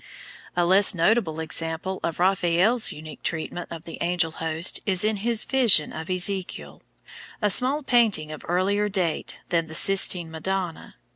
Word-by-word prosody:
A 175 -1 +1
less 190 +2 +4
notable 170 -2 +1
example 160 +4 -3
of 165 -1 -3
Raphael's 185 +5 +2
unique 155 0 -11
treatment 170 +2 -5
of 165 -1 -8
the 165 - -10
angel 170 -1 0
host 165 +2 -2
is 190 -2 +2
in 215 0 0
his 230 +2 +2
Vision 235 - +3
of 160 +2 -8
Ezekiel, 185 +1 -2 0.6
a 210 -2 +2
small 270 +8 +4
painting 220 - +1
of 155 - -9
earlier 200 +4 0
date 180 -5 -2
than 165 -2 0
the 160 - -7
Sistine 180 -2 +3
Madonna. 175 +1 -5
180 Hz, 150 wpm, -24 LUFS, 165-200 Hz, 0.6 s, less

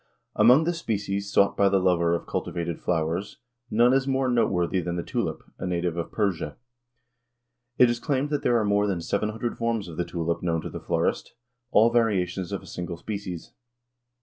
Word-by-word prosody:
Among 125 +8 +6
the 175 +2 0
species 100 - -3
sought 100 - +3
by 100 -1 +4
the 100 - +3
lover 85 -2 +2
of 85 - -5
cultivated 85 -1 -3
flowers 85 +3 -1 0.3
none 120 +3 +4
is 135 0 +2
more 135 -1 +1
noteworthy 95 -7 +1
than 85 0 -3
the 85 - -2
tulip, - - -3 0.2
a - - -3
native 85 -1 -1
of 85 -1 -4
Persia. 100 -6 -1 1.2
It 125 - +7
is 120 0 -1
claimed 140 +3 -1
that 145 - 0
there 120 - +3
are 110 - +1
more 105 0 +2
than 95 -4 -1
seven 105 +5 -1
hundred 115 +2 -4
forms 115 -4 -1
of 80 -2 -9
the 90 - +1
tulip 85 -1 -2
known 85 -2 0
to - - -6
the - - -6
florist - - -1 0.3
all 115 0 +5
variations 95 -6 +1
of - - -4
a - - -12
single 85 -1 -6
species. 95 -3 -6
100 Hz, 190 wpm, -26 LUFS, 85-115 Hz, 1.2 s, It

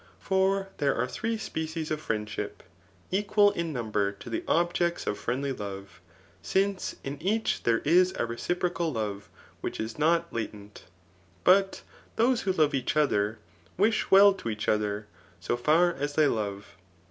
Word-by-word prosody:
For 195 0 +1
there 140 -2 +2
are 125 +2 0
three 225 - -2
species 160 -5 -4
of 155 0 -2
friendship, 105 -3 -4 0.5
equal 205 +1 +3
in 170 -3 -3
number 110 -6 -1
to 100 - -11
the - - -2
objects 175 0 +1
of 105 - -2
friendly 130 +6 -2
love 100 -4 -7
j 90 - -33 0.3
since 195 0 0
in 140 +1 -6
each 215 +6 0
there 115 -1 +2
is 180 +4 +5
a - - 0
reciprocal 170 +7 -2
love 105 -3 -4 0.3
which - - -4
is 110 +4 -5
not 170 +2 +2
latent. 105 -2 -6 0.6
But 195 +1 +4 0.3
those 240 +2 +2
who 195 - 0
love 155 -5 +2
each 135 +2 -1
other, 110 -7 +2 0.4
wish 215 +4 +2
well 200 +1 +8
to 155 -11 -6
each 105 -1 -4
other, 105 0 0 0.3
so - - -1
far 160 +8 +3
as 145 0 -3
they 155 0 +4
love. 100 -7 -3
150 Hz, 160 wpm, -28 LUFS, 110-185 Hz, 0.6 s, well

